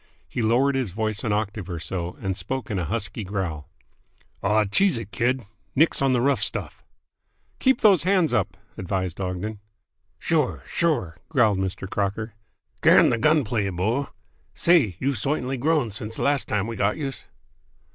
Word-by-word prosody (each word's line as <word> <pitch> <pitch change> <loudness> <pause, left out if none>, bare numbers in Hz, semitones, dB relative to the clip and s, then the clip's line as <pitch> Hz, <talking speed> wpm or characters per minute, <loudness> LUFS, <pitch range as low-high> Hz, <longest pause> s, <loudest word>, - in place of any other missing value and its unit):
He 120 - -3
lowered 125 +5 +3
his 130 -5 -1
voice 110 +2 -2
an 110 - 0
octave 105 -2 -2
or 85 -2 -4
so, 85 +2 -4
and 95 -1 -2
spoke 130 +3 -4
in 100 - -1
a 90 - -2
husky 105 +3 -3
growl. 90 -6 -4 0.7
"Aw, 105 +2 +3
cheese 175 - +3
it, 110 -3 -7
kid. 120 +5 0 0.3
Nix 155 +2 +3
on 135 -1 +3
the 125 -2 +2
rough 140 +2 +2
stuff!" - - -3 0.8
"Keep 265 -2 +3
those 200 -6 +6
hands 185 -2 +2
up!" 95 -2 0 0.2
advised 95 -1 -3
Ogden. 95 +3 -4 0.6
"Sure! 155 -6 0
Sure!" 120 - -1
growled 115 -10 +3
Mr. 95 0 -3
Crocker. 105 +3 -2 0.5
"Can - - +6
the 115 - 0
gun 150 +3 +4
play, 105 -3 -1
bo! 110 +10 -1 0.5
Say, 155 - +4
you've 135 -3 -1
soitanly 135 +2 -1
grown 150 -4 +1
since 110 +1 -5
de - - -3
last 140 -1 +2
time 105 -1 0
we 115 0 -5
got 105 0 +1
youse!" 135 -4 -5
110 Hz, 165 wpm, -24 LUFS, 95-135 Hz, 0.8 s, those